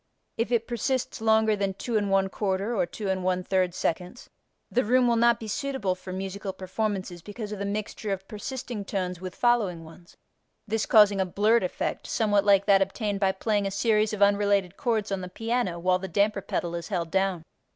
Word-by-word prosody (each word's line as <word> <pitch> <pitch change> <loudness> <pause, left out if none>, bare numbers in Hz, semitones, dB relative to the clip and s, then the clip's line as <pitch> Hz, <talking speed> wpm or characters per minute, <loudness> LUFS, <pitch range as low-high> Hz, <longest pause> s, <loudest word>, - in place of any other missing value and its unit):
If 230 +2 -2
it 230 -2 +2
persists 245 0 -2
longer 220 -1 +3
than 195 -2 -2
2 240 - -6
1/4 195 +1 0
or 195 - +2
2 210 +4 -7
1/3 185 -1 0
seconds 180 +8 -3 0.4
the 250 - +2
room 250 +3 +3
will 235 - +3
not 235 0 +4
be 220 - -7
suitable 260 -4 -1
for 185 0 -9
musical 195 +1 -4
performances 190 -2 -3
because 210 +3 -7
of 210 - -5
the 200 - -2
mixture 210 0 -4
of 195 0 -4
persisting 240 0 -5
tones 180 -3 -3
with 185 -1 -6
following 215 -9 +1
ones, 170 +2 -16 0.5
this 220 0 -1
causing 205 -2 +6
a - - +1
blurred 215 +5 +3
effect 180 - -3
somewhat 205 -3 +2
like 200 -1 +5
that 195 -1 +5
obtained 200 +1 -1
by 195 -1 +3
playing 205 +1 0
a - - -1
series 215 +1 +2
of 210 -1 +2
unrelated 200 -2 +2
chords 225 -6 -1
on 195 -1 -1
the 180 - -6
piano 225 -3 -1
while 180 +1 +2
the 190 - -5
damper 200 +3 +1
pedal 170 -2 -3
is 170 -1 -4
held 170 -5 -2
down. 190 -3 0
200 Hz, 190 wpm, -27 LUFS, 190-220 Hz, 0.5 s, causing